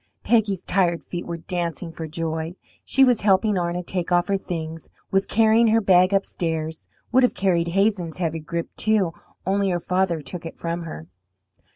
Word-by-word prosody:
Peggy's 205 -5 +2
tired 175 -3 +1
feet 175 -1 -6
were 170 -1 -4
dancing 170 0 -3
for 165 -1 -6
joy. 160 +1 -3 0.3
She 270 - +3
was 250 -4 +4
helping 205 +1 +3
Arna 175 0 -1
take 180 0 -3
off 175 +2 +2
her 200 - +3
things, 165 -4 -5 0.2
was 195 0 +2
carrying 225 +1 +4
her 225 +1 +4
bag 185 -2 +4
upstairs 160 -5 -2 0.2
would 255 +1 +5
have 250 - +3
carried 175 -3 +1
Hazen's 185 -2 0
heavy 165 -2 -1
grip, 170 +2 -5
too, 205 -6 +1 0.3
only 195 +1 +1
her 175 -1 0
father 180 -1 0
took 170 +3 -7
it 165 - -8
from 170 0 -3
her. 80 - -7
180 Hz, 175 wpm, -23 LUFS, 165-195 Hz, 0.3 s, would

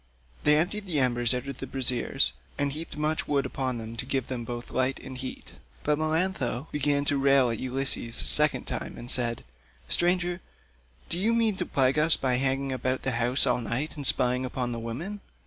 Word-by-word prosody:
They 150 0 +6
emptied 195 +5 -1
the 160 -5 0
embers 120 -2 +2
out 125 +1 -1
of 140 -2 -6
the - - -5
braziers, 125 - +2 0.2
and 140 -1 0
heaped 155 0 -6
much 155 +1 0
wood 140 -2 +1
upon 130 -2 -2
them 115 0 -6
to 120 - -3
give 135 -2 -1
both 120 -1 -5
light 130 +1 0
and 130 0 -8
heat; 130 0 -7 0.3
but 150 0 +1
Melantho 155 -5 0
began 145 0 0
to 140 -1 +1
rail 135 -3 +4
at 115 - -3
Ulysses 130 -2 -2
a - - -2
second 150 0 +3
time - - -4
and 120 - -2
said, 120 -2 0 0.4
"Stranger, 175 0 +2 0.7
do 170 - -2
you 225 +4 +2
mean 225 -3 +2
to - - -2
plague 135 +2 +2
us 155 +1 +7
by 130 -2 +1
hanging 135 +1 0
about 130 0 -2
the 135 - +1
house 120 +2 +2
all - - +1
night 125 +7 -2
and 145 -3 0
spying 125 0 +1
upon 125 -1 -3
the 115 - -4
women? 155 - -5
135 Hz, 200 wpm, -27 LUFS, 125-150 Hz, 0.7 s, us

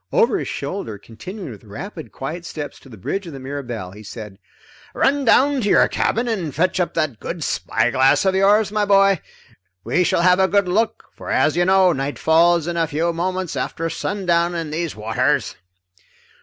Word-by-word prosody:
Over 470 -2 +3
his - - -4
shoulder, 110 - -4
continuing 145 - -9
with 105 - -12
rapid 160 - -8
quiet 160 +6 -6
steps 150 -3 -7
to 135 - -17
the 110 - -12
bridge 195 - -4
of 165 - -8
the 135 - -8
Mirabelle, 125 -8 -6
he 105 +2 -12
said: 105 -2 -9 0.6
"Run 280 0 +2
down 270 +3 +4
to 205 - 0
your - - +5
cabin 235 +2 0
and 180 - -2
fetch 185 +2 +1
up 175 - -1
that 155 -9 -1
good 170 -2 -5
spyglass 130 +8 +2
of 190 - +3
yours, 200 +2 +3
my 210 -1 +1
boy. 195 -3 +4 0.6
We 180 - +1
shall 170 - +1
have 180 +1 +5
a 190 - +4
good 200 0 +2
look, 215 +5 0
for - - -10
as - - +2
you 175 - +2
know, 190 -1 +5
night 135 +1 -3
falls 165 0 +3
in 170 0 -3
a 165 -1 +1
few 165 +3 -1
moments 185 +1 -2
after 165 0 -3
sundown 175 -3 0
in 165 -3 -4
these 165 0 -3
waters." 115 +7 0
170 Hz, 190 wpm, -21 LUFS, 135-195 Hz, 0.6 s, your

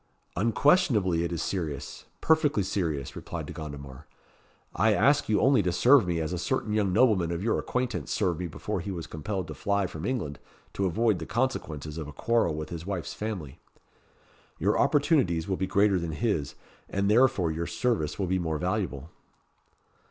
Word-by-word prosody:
"Unquestionably 110 - +3
it 85 - -2
is 85 - -2
serious 75 -6 -4 0.2
perfectly 150 -9 +3
serious," 80 -8 -2
replied - - -6
De - - -8
Gondomar. 70 -4 -8 0.7
"I 105 +4 +3
ask 145 +2 +3
you 105 -2 +3
only 130 0 +4
to 90 -2 0
serve 120 +3 +5
me 85 -1 0
as 80 +2 -2
a 90 - -2
certain 125 0 -1
young 105 -3 +1
nobleman 95 -5 +3
of 85 +2 -3
your 115 - +1
acquaintance 125 -1 -2
served 95 -7 0
me 90 - -2
before 80 - -4
he 100 - -5
was 85 -4 -4
compelled 95 +4 -4
to - - -4
fly 100 -1 0
from 80 -3 -7
England 105 - -3 0.3
to 95 - 0
avoid 105 +2 +1
the - - -6
consequences 80 - -2
of 75 - -5
a 75 - -9
quarrel 110 -1 +1
with 75 0 -5
his 85 -1 -6
wife's 90 -4 -4
family. 95 -11 -5 1.0
Your - - +1
opportunities 135 - +2
will 95 - 0
be 95 - -1
greater 100 -1 +3
than 85 -2 -4
his, 75 - -1 0.3
and 100 0 0
therefore 105 -6 +3
your 85 +2 -3
service 105 -12 -1
will 100 - -1
be 95 +1 0
more 80 -3 -1
valuable." 90 -5 -2
95 Hz, 180 wpm, -28 LUFS, 80-110 Hz, 1.0 s, serve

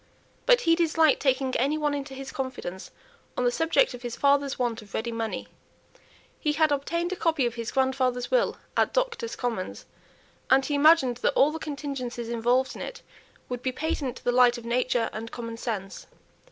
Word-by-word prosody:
But - - +6
he 330 - +4
disliked 325 -3 +3
taking 265 -1 +1
any 280 +5 +1
one 295 -1 0
into 275 -1 -5
his 270 0 -7
confidence 250 -9 -5 0.5
on - - +1
the 245 - +3
subject 325 - +2
of 245 - -9
his 240 -1 -5
father's 280 -1 +2
want 240 -2 -1
of 205 -2 -11
ready 235 +2 -2
money. 225 -1 -3 0.9
He 300 -2 0
had 310 0 +3
obtained 335 +6 -1
a - - -3
copy 320 -7 +1
of 240 - -1
his 230 -1 -5
grandfather's 260 -2 0
will - - +2 0.2
at - - +1
Doctors' 475 -2 -1
Commons, 230 -7 -4 0.6
and 265 0 +5
he 290 - -2
imagined 285 -4 +5
that 265 - +1
all 285 +3 +5
the 320 - -5
contingencies 275 -6 -5
involved 240 +3 +1
in - - -8
it 485 - -7 0.4
would 250 -1 -4
be 255 - -1
patent 275 -2 -2
to - - -14
the 245 - +2
light 245 0 +5
of 235 - -10
nature 240 -1 +1
and 225 +1 -5
common 230 -1 -6
sense. 205 -5 -5
260 Hz, 190 wpm, -27 LUFS, 240-300 Hz, 0.9 s, But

